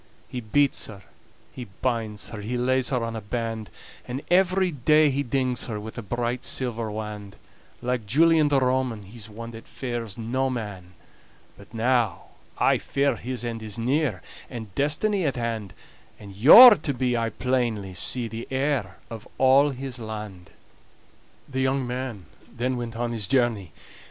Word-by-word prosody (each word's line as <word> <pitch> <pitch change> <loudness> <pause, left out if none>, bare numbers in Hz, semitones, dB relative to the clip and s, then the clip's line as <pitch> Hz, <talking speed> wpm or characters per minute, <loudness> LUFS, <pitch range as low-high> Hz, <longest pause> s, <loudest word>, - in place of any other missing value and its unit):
He 125 - -5
beats 140 +5 +1
her, 100 -3 -11 0.5
he 125 - -7 0.2
binds 110 -4 -1
her, 110 -3 -6
He 120 +4 -3
lays 130 +1 +1
her 125 -3 0
on 115 0 -5
a 110 - -4
band; 115 0 -4 0.4
And 130 +3 -5
every 185 0 +3
day 150 +2 +4
he 140 +2 0
dings 130 -2 -1
her 110 -3 -4
With 110 +1 -8
a 115 - -5
bright 120 +3 -3
silver 120 -3 -2
wand. 105 -2 -7 0.5
Like 125 -3 -2
Julian 160 +5 +4
the 140 -2 +3
Roman, 130 -4 0
He's 110 +2 -11
one 115 +2 -8
that 115 0 -11
fears 120 -5 -5
no 130 +4 -1
man, 100 -7 -6 0.6
But 100 - -16
now 120 -1 0 0.3
I - - +3
fear 140 -2 0
his 125 +1 -5
end 115 -1 -4
is 110 -2 -5
near, 125 - 0 0.3
And 110 -6 -8
destiny 175 - +1
at 140 -4 0
hand; 115 -5 -3 0.5
And 100 -2 -11
you're 210 - +10
to 140 -4 -3
be, 125 -1 0
I 115 -1 0
plainly 115 -5 -1
see, 120 +6 +1
The 115 +1 -7
heir 130 - -1
of 110 -2 -8
all 135 +2 +5
his 130 -1 -6
land." 105 -5 -7
120 Hz, 145 wpm, -25 LUFS, 110-130 Hz, 0.6 s, you're